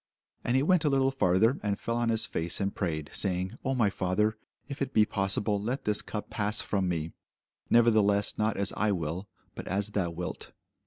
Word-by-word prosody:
And 120 - 0
he 130 - +3
went 180 +1 +3
a 150 - +3
little 135 -1 +2
farther, 110 0 +2
and 100 -1 -1
fell 115 - -2
on 120 -1 0
his 115 -1 +1
face, 80 +1 -2
and 100 -1 -1
prayed, 80 -6 -3
saying, 95 0 0
O 135 +1 0
my 110 -5 +2
Father, 100 +4 0 0.3
if 140 -1 -7
it 135 -1 -2
be 110 - +6
possible, 100 +1 0
let 125 +6 -3
this 105 -1 +2
cup 105 - -6
pass 105 0 0
from 95 -3 0
me: 80 -2 -2 0.6
nevertheless 110 -3 +4
not 110 0 0
as 100 -1 0
I 105 +1 +1
will, 85 +3 -4 0.2
but - - -8
as 100 +2 0
thou 95 -4 0
wilt. 85 +1 -6
105 Hz, 200 wpm, -29 LUFS, 95-115 Hz, 0.6 s, be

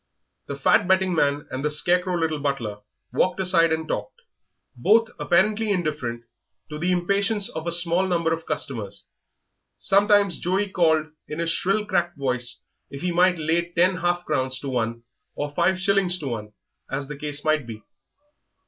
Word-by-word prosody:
The 140 - -4
fat 140 +5 +3
betting 190 -1 +3
man 145 -2 +1
and 130 +1 -4
the 150 - +1
scarecrow 180 +4 +1
little 160 -2 -1
butler 130 -8 -3 0.3
walked 185 +1 +1
aside 175 -3 +4
and 160 0 -1
talked, - - -4 0.6
both 225 +2 +3
apparently 210 +5 +2
indifferent 150 -11 -2 0.5
to 150 - -5
the 175 +3 0
impatience 200 +4 +1
of 160 +1 -6
a 170 +2 +3
number 170 -2 +1
of 165 - -2
small 165 - -22
customers; 105 -10 -3 0.7
sometimes 200 -1 +3
Joey 195 +3 0
called 160 -4 +3 0.2
in 150 - -6
his 165 0 0
shrill 195 +5 +1
cracked 175 -4 -1
voice 125 -3 -2 0.3
if 140 +2 -8
he 180 - 0
might 180 +1 +3
lay 165 +2 0
ten 180 +2 +2
half 175 0 -1
crowns 130 -3 -1
to 140 - -4
one, 115 -2 -2 0.3
or 145 0 -3
five 175 +5 +2
shillings 195 -2 +2
to 145 -6 -5
one, 105 -3 -6 0.4
as 135 0 -3
the 150 - -6
case 145 +1 -5
might 155 -5 +1
be. 110 -2 -8
165 Hz, 165 wpm, -24 LUFS, 145-185 Hz, 0.7 s, aside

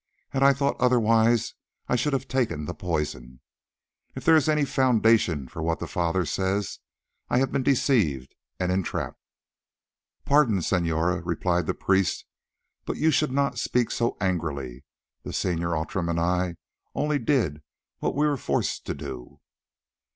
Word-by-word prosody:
Had 135 - -1
I 140 0 +7
thought 140 +1 -1
otherwise 115 -2 +3 0.3
I - - +1
should 130 +4 0
have 135 -1 -1
taken 110 - -1
the 85 - -4
poison. 75 -9 -4 0.8
If - - -7
there 165 - +7
is 155 -1 +3
any 150 -1 +3
foundation 110 - +2
for 80 - -7
what 80 +1 0
the - - -5
Father 85 +1 0
says, 95 +5 -2 0.5
I - - +2
have 135 +1 +1
been 135 - 0
deceived 110 - +1 0.3
and 90 -1 0
entrapped." 95 -1 -2 1.0
"Pardon, 125 - +3
senora," 85 0 0
replied 85 0 -1
the - - -1
priest; 95 -2 +1 0.6
"but - - -4
you 160 +1 +3
should 150 -1 +1
not 140 0 0
speak 120 -2 0
so 120 0 -1
angrily. 70 -9 -2 0.4
The - - -7
Senor 85 -2 -1
Outram 85 +2 -2
and 85 0 0
I 90 +1 0 0.4
only 150 0 0
did 115 - 0 0.4
what - - -1
we 150 +2 +2
were 145 -2 +1
forced - - -2
to - - -2
do." 65 -3 -8
95 Hz, 150 wpm, -26 LUFS, 85-130 Hz, 1.0 s, I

